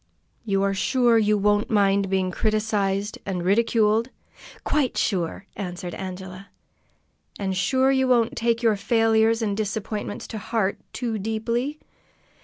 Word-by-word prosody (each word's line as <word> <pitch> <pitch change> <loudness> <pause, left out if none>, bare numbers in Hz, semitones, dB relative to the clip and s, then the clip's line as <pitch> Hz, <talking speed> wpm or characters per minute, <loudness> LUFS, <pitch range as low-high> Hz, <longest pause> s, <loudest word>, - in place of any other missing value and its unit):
"You 195 -2 +1
are 200 0 +1
sure 235 +3 +3
you 210 -1 +2
won't 205 +1 +2
mind 200 -2 +2
being 190 -1 0
criticised 210 -1 -1
and 180 -3 -3
ridiculed?" 225 +2 +2 0.5
"Quite 280 -5 0
sure!" 185 -1 -1
answered 180 -3 -5
Angela. 190 +1 -7 0.9
"And 190 -2 -2
sure 260 +8 +2
you 265 -1 +2
won't 235 -3 +2
take 230 0 0
your 225 -2 +4
failures 225 +1 +2
and 205 -2 -1
disappointments 210 0 -4
to 220 - -5
heart 200 -1 -1
too 230 -4 -3
deeply?" 230 +7 -2
210 Hz, 130 wpm, -24 LUFS, 195-230 Hz, 0.9 s, your